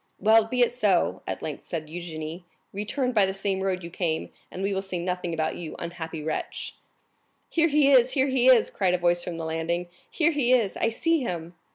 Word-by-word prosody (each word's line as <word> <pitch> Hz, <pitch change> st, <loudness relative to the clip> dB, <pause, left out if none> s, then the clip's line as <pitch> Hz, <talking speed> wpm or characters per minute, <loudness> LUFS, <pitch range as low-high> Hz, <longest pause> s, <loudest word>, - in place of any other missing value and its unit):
"Well, 220 Hz, +1 st, +5 dB
be 250 Hz, +2 st, -1 dB
it 240 Hz, 0 st, +3 dB
so," 200 Hz, -7 st, +2 dB
at -, -, -4 dB
length 150 Hz, -3 st, -6 dB
said 160 Hz, -2 st, -4 dB
Eugénie; 160 Hz, 0 st, -6 dB, 0.3 s
"return 230 Hz, +6 st, -1 dB
by 210 Hz, -5 st, +3 dB
the 190 Hz, -, -3 dB
same 195 Hz, -1 st, -1 dB
road 185 Hz, -2 st, -1 dB
you 170 Hz, -, -7 dB
came, 165 Hz, -3 st, -2 dB, 0.2 s
and 185 Hz, -, -6 dB
we 200 Hz, 0 st, 0 dB
will 190 Hz, -, -1 dB
say 190 Hz, -2 st, -4 dB
nothing 180 Hz, 0 st, -2 dB
about 160 Hz, -1 st, -1 dB
you, 165 Hz, -3 st, -7 dB
unhappy 165 Hz, -2 st, -6 dB
wretch." 155 Hz, 0 st, -4 dB, 0.8 s
"Here 330 Hz, 0 st, +3 dB
he 290 Hz, -2 st, +4 dB
is, 255 Hz, -1 st, +5 dB
here 265 Hz, -2 st, +3 dB
he 260 Hz, -2 st, +2 dB
is!" 250 Hz, -4 st, +6 dB
cried 185 Hz, -3 st, +1 dB
a -, -, 0 dB
voice 175 Hz, 0 st, +2 dB
from 170 Hz, -2 st, -5 dB
the 165 Hz, -, -4 dB
landing; 165 Hz, +2 st, -2 dB, 0.2 s
"here 330 Hz, 0 st, +2 dB
he 265 Hz, -5 st, +2 dB
is! 225 Hz, -6 st, +2 dB
I 225 Hz, -, +1 dB
see 330 Hz, +8 st, +1 dB
him!" 175 Hz, -6 st, -4 dB
190 Hz, 215 wpm, -26 LUFS, 170-240 Hz, 0.8 s, is